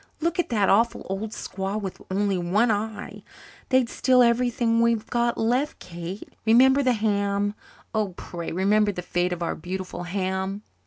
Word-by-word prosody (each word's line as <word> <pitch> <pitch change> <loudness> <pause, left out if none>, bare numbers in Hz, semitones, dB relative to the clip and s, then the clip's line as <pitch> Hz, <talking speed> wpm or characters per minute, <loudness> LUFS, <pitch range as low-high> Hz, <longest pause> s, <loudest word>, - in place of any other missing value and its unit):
Look 340 +3 -1
at 350 - +1
that 210 -4 +2
awful 230 +4 +2
old 200 +3 -3
squaw 195 -1 -4
with 195 -3 -6
only 200 +1 +1
one 190 +7 +2
eye. 215 +1 -4 0.5
They'd 260 -2 +3
steal 250 +1 +4
everything 235 -1 +2
we've 230 -2 +2
got 240 0 +1
left, 250 +6 0
Kate. 175 +3 -8
Remember 260 +5 +5
the 255 -2 +3
ham 205 -2 0 0.4
oh, 210 -5 -1
pray 170 -1 -6
remember 205 +4 +2
the 180 -2 -6
fate 175 +1 0
of 175 -1 -3
our - - -1
beautiful 180 +1 -5
ham." 190 +2 -2
210 Hz, 160 wpm, -25 LUFS, 190-235 Hz, 0.5 s, Remember